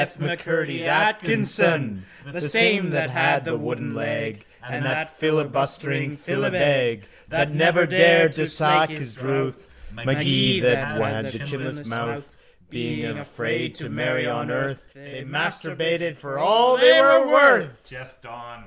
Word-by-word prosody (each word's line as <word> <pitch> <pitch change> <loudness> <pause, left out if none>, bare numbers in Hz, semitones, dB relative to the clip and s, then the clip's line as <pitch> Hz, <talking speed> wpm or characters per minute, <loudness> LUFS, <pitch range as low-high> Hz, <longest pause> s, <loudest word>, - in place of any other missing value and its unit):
M'Curdy 165 0 -4
Atkinson, 165 - +1 0.2
The 165 +5 -8
same 200 +3 +3
that 155 0 -1
had - - +1
the - - -3
wooden - - -6
leg 110 -1 -6 0.2
And 125 +2 -6
that 155 +4 -2
filibustering 145 -2 -3
filibeg 140 - -1 0.3
That 145 -2 -1
never 170 +3 +3
dared 170 -2 +5
to 155 -1 -3
slake 155 0 +2
his 145 -7 -9
drouth, 135 +1 -4 0.2
Magee 120 - +1
that 125 +1 0
had 110 0 -3
the 120 - -7
chinless 140 +1 -8
mouth. 115 +5 -7 0.4
Being - - -6
afraid - - -5
to - - -9
marry - - -2
on - - -4
earth 135 -1 -5
They 135 -1 -14
masturbated 165 +3 -3
for 140 +1 -8
all 235 +8 +4
they 250 0 +8
were 275 -1 +6
worth. 260 - +5
Jest 130 0 -15
on. 120 0 -15
145 Hz, 130 wpm, -21 LUFS, 130-165 Hz, 0.4 s, they